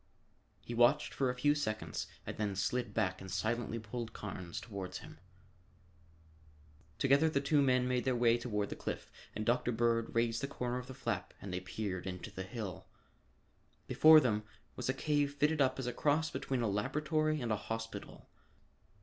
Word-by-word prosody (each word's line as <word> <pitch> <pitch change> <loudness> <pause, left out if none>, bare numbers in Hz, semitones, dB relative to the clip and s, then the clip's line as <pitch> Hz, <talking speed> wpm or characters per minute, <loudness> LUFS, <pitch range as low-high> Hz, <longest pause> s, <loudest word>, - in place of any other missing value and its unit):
He 120 - -5
watched 120 +6 +4
for 135 -2 +1
a 125 - -1
few 145 +4 +3
seconds 110 -8 -3 0.2
and - - -5
then 105 -2 -1
slid 115 +4 -1
back 95 -1 0
and 95 - -8
silently 110 +5 -1
pulled 115 +1 -5
Carnes 95 -4 -6
toward 100 -5 -6
him. - - -9 1.8
Together 140 +4 +4
the 140 - +1
two 145 +1 +3
men 125 -2 +3
made 125 -1 +1
their 130 -1 +1
way 120 0 +4
toward 105 -4 -1
the - - -4
cliff - - -5 0.2
and 110 - -2
Dr. 120 0 +2
Bird 115 0 +1
raised 115 0 +2
the 140 - -1
corner 125 -2 -2
of 125 - -9
the 130 - -8
flap 115 -8 -3
and 95 -2 -6
they 90 - -1
peered 95 -1 -4
into 90 -1 -5
the 95 - -6
hill. 95 -2 -6 1.0
Before 155 0 +8
them 110 -7 +1 0.3
was - - -3
a - - +3
cave 145 0 +1
fitted 150 +1 +2
up 130 -1 +3
as 130 - -3
a 125 - -2
cross 150 +3 +1
between 130 -4 -1
a - - +2
laboratory 150 +8 0
and 120 -4 -2
a - - +3
hospital. 115 +2 -6
120 Hz, 180 wpm, -34 LUFS, 105-135 Hz, 1.8 s, Before